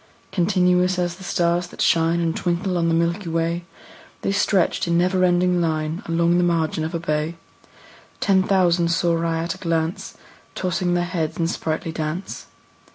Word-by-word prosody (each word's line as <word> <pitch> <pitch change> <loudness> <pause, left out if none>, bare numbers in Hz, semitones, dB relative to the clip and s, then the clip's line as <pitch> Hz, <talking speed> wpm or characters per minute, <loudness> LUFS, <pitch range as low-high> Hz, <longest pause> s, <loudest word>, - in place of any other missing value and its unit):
Continuous 180 -1 +2
as 175 -1 -1
the 190 - -12
stars 175 0 0
that - - -15
shine 165 +1 +2
And 165 -1 0
twinkle 180 +1 -1
on 170 -1 +1
the 165 - +2
milky 170 +3 0
way, 165 +1 -1 0.6
The 195 - 0
stretched 195 -3 +1
in 170 0 +2
never 185 +1 +2
ending 180 0 +3
line 160 +1 -1
Along 170 +1 +2
the - - +3
margin 165 -2 0
of 160 +2 -3
a - - -1
bay: 155 0 -2 0.8
Ten 190 -1 +3
thousand 180 -3 +2
saw 170 0 +1
I 165 -1 0
at 170 0 -2
a - - -14
glance, 165 0 -2 0.4
Tossing 180 -1 -1
their 175 0 +1
heads 165 -3 -3
in 165 - 0
sprightly 165 -1 -2
dance. 160 +3 -5
170 Hz, 170 wpm, -22 LUFS, 165-180 Hz, 0.8 s, ending